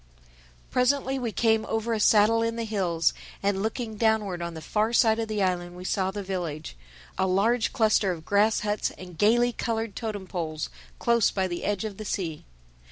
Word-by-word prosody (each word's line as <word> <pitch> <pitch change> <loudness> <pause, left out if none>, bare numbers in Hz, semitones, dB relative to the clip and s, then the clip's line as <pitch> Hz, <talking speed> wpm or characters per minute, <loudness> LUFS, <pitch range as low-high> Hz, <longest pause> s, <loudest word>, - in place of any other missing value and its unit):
Presently 265 +1 +1
we 240 -3 -2
came 220 0 +2
over 225 +1 -1
a 220 - 0
saddle 215 +2 +5
in 230 0 0
the 230 - -2
hills, 180 -7 +1 0.3
and 195 -1 +1
looking 220 0 -3
downward 210 -5 +1
on 170 -1 -4
the - - -6
far 215 +6 0
side 225 -1 +4
of 225 - -1
the 210 -2 -1
island, 175 -1 -1
we 180 - -8
saw 190 0 0
the 200 +1 -5
village—a 155 - -5
large 220 +6 +2
cluster 220 -5 +3
of 160 -3 -6
grass 210 +2 +3
huts 210 0 0
and 180 -2 -10
gaily 240 +3 +4
colored 225 -3 -2
totem 215 -4 -4
poles 160 -4 -4 0.3
close 235 -2 +3
by 190 -1 -1
the 175 -1 -5
edge 205 -1 -1
of 205 -3 -5
the 215 - -7
sea. 165 -7 -3
210 Hz, 185 wpm, -26 LUFS, 185-225 Hz, 0.3 s, saddle